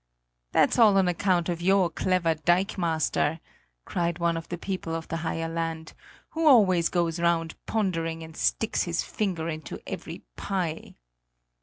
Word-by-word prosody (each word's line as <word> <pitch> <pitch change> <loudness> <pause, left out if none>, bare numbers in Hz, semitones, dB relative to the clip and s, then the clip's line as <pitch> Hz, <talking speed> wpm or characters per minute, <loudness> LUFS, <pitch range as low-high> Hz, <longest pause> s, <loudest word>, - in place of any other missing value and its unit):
"That's - - +3
all 210 -4 +6
on 190 -2 +4
account 180 -1 +1
of 170 -1 -2
your 190 0 +4
clever 180 -3 +1
dikemaster," 165 -2 0 0.5
cried 170 -1 -1
one 170 -1 +1
of 165 0 -6
the 175 - -4
people 180 -3 -4
of 165 -1 -5
the 165 - -2
higher 165 0 -2
land, 165 -1 -4 0.4
"who 325 0 0
always 185 - +5
goes 170 -1 0
round 170 -1 +1
pondering 165 -6 -1
and 160 0 -11
sticks - - 0
his - - -1
finger 180 -6 -2
into 155 -2 -5
every - - -7
pie!" 175 -5 -3
170 Hz, 150 wpm, -27 LUFS, 165-185 Hz, 0.5 s, all